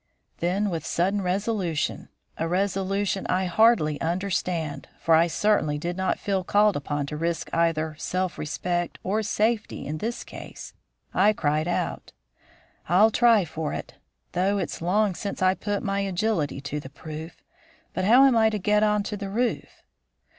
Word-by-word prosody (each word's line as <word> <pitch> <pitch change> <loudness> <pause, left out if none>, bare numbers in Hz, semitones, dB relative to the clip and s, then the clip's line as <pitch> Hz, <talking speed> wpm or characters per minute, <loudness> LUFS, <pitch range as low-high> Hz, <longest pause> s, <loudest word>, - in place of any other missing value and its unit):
Then 190 +4 0
with 165 -3 -3
sudden 190 +5 0
resolution 185 -3 -1 0.3
a 165 - -2
resolution 195 +2 0
I 185 +1 +1
hardly 180 -5 +3
understand, 170 -4 -2
for 165 - +2
I 165 +2 +5
certainly 165 -4 +1
did 170 +4 -3
not 190 0 0
feel 195 -2 -1
called 205 +2 +3
upon 145 0 -2
to 145 - -6
risk 165 0 -2
either 160 -2 +1
self 185 0 -2
respect 175 +3 -2
or 210 +4 0
safety 220 +1 -1
in 155 +2 -4
this 230 +5 -3
cause - - -10 0.4
I 205 +3 +4
cried 155 -3 0
out: 175 - -3 0.8
"I'll 205 +6 +5
try 230 -4 +4
for 160 -1 -4
it; - - -6 0.4
though 195 +3 +1
it's 185 -4 -4
long 200 +4 +2
since 200 +3 -5
I 185 0 +5
put 205 +1 -3
my 200 0 -1
agility 190 -7 -1
to 145 +1 -4
the 135 - -9
proof. 155 +3 -9 0.5
But - - -2
how 245 +6 +7
am 265 -3 +5
I 220 -1 +5
to 215 - -2
get 210 +2 +2
onto 210 0 +1
the 200 -1 -5
roof?" 230 +2 -2
185 Hz, 160 wpm, -25 LUFS, 165-205 Hz, 0.8 s, how